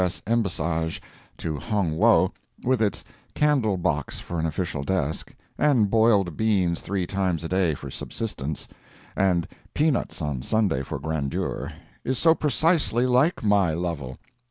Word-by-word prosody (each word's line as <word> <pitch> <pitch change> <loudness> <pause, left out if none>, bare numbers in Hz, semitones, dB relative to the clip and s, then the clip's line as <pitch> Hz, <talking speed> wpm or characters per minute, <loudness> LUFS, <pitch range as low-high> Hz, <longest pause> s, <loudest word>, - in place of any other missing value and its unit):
S. 90 -1 -1
embassage 85 -8 0 0.4
to 75 -3 -3
Hong 100 -8 -1
Wo, 105 0 +4 0.3
with 130 -1 +2
its 105 -2 0 0.3
candle 135 -10 +2
box 85 -5 -1
for 85 - -5
an 80 - 0
official 80 -2 -2
desk, 80 0 -2 0.2
and 125 -9 +3
boiled 105 -7 +3
beans 95 -6 +1
three 95 0 -2
times 90 -3 -1
a - - -2
day 90 -3 +1
for 70 -1 -8
subsistence, 75 - -5 0.5
and 90 -3 +2 0.3
peanuts 150 -3 +1
on 75 -5 -2
Sunday 100 - +1
for 70 +3 -4
grandeur, 70 -1 -3 0.3
is 130 0 -1
so 160 +4 +5
precisely 155 -5 +2
like 130 +6 +2
my 100 -6 +3
Lovel! 80 -7 -4
95 Hz, 140 wpm, -25 LUFS, 80-115 Hz, 0.5 s, so